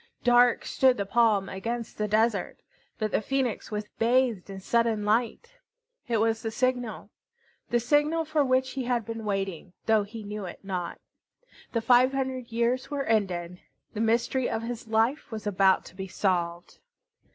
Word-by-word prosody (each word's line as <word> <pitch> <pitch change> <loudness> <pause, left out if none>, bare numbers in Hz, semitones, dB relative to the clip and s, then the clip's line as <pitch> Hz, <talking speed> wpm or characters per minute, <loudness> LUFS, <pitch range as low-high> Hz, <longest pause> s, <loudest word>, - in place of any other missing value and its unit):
Dark 245 0 +4
stood 260 -1 +3
the 200 - -1
palm 210 -2 +3
against 230 +5 -4
the 210 - 0
desert, 215 -2 +1 0.4
but 215 -2 -2
the - - +1
Phoenix 260 0 -1
was 210 -1 -3
bathed 235 -4 +2
in 195 -1 -7
sudden 225 +1 +1
light. 240 - -1 0.5
It 235 -2 +1
was 225 +1 +1
the 225 - -2
signal, 245 0 -2 0.6
the 240 - +2
signal 295 +6 +2
for 310 -1 +1
which 260 0 +1
he 260 -1 -4
had 240 -3 0
been 225 -1 -6
waiting, 195 -3 -3
though 220 -1 +4
he 215 +2 -8
knew 210 -1 -5
it 175 - -9
not. 185 -3 -4 0.7
The 230 - +1
five 250 +3 +5
hundred 260 -3 -3
years 235 +2 0
were 285 -1 -2
ended. 180 -6 -1 0.3
The 215 - -3
mystery 235 +3 +1
of 225 - -2
his 235 -1 -5
life 225 +7 +1
was 220 -1 -6
about 195 -2 +3
to - - -13
be 190 0 -5
solved. 175 -2 -2
225 Hz, 165 wpm, -27 LUFS, 205-245 Hz, 0.7 s, five